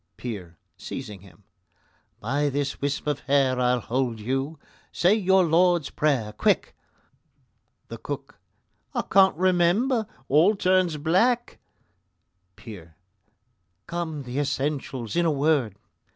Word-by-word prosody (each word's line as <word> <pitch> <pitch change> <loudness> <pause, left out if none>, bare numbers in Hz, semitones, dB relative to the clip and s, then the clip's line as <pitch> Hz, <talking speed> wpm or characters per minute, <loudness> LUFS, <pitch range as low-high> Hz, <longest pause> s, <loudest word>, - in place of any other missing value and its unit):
PEER 95 -9 -7 0.2
(seizing 105 -8 -7
him): 95 0 -18 0.8
By 140 +6 0
this 140 0 -3
wisp 140 0 -2
of 150 -2 -1
hair 135 -2 +1
I'll 125 0 +2
hold 120 -2 -2
you; 135 +7 -3 0.3
say 180 +4 +3
your 190 -3 +3
Lord's 175 -1 +2
Prayer, 130 -9 0
quick! - - 0 1.1
THE - - -8
COOK: - - -7 0.6
I - - 0
can't 190 -4 +4
remember; 185 +7 +2 0.2
all 165 +10 +4
turns 185 -4 +2
black 225 +11 +1 1.0
PEER: 85 -9 -12 0.9
Come, 165 -4 -4
the 125 +2 -4
essentials 135 -3 -3
in 175 0 +2
a - - +3
word! 140 -7 +1
145 Hz, 115 wpm, -25 LUFS, 125-175 Hz, 1.1 s, can't